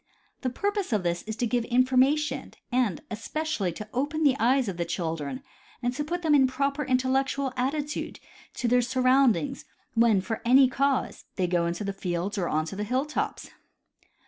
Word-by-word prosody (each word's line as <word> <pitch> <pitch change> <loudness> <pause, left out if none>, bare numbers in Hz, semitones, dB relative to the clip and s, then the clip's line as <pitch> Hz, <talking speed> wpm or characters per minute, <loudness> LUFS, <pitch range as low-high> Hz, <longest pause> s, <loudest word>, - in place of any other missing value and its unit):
The 255 - 0
purpose 405 - -2
of 210 -4 +1
this 175 0 -1
is 220 - -3
to 240 - -1
give 240 0 0
information 260 +3 +2 0.2
and 240 -9 +1
especially 225 - -2
to 210 +5 -8
open 290 +5 -1
the 280 -3 +5
eyes 255 +1 +3
of 190 -3 -4
the 170 - 0
children 165 - -3 0.4
and 245 +1 0
to 295 +3 -2
put 350 +4 -3
them 315 -2 +3
in 275 -2 +6
a - - +3
proper 280 +3 -1
intellectual 265 +1 0
attitude 285 +3 -2 0.4
to 245 - -1
their 245 +1 +4
surroundings, 260 +2 +2 0.3
when, 230 -3 +4
for 220 +4 -4
any 260 +3 +6
cause, 275 +1 -1
they 185 - +1
go 175 -1 +1
into 170 +4 -3
the 200 0 -3
fields 185 +2 -3
or 175 - -1
onto 155 +4 -1
the 205 - -3
hill 255 +6 0
tops. 300 - -3
255 Hz, 180 wpm, -27 LUFS, 205-275 Hz, 0.4 s, in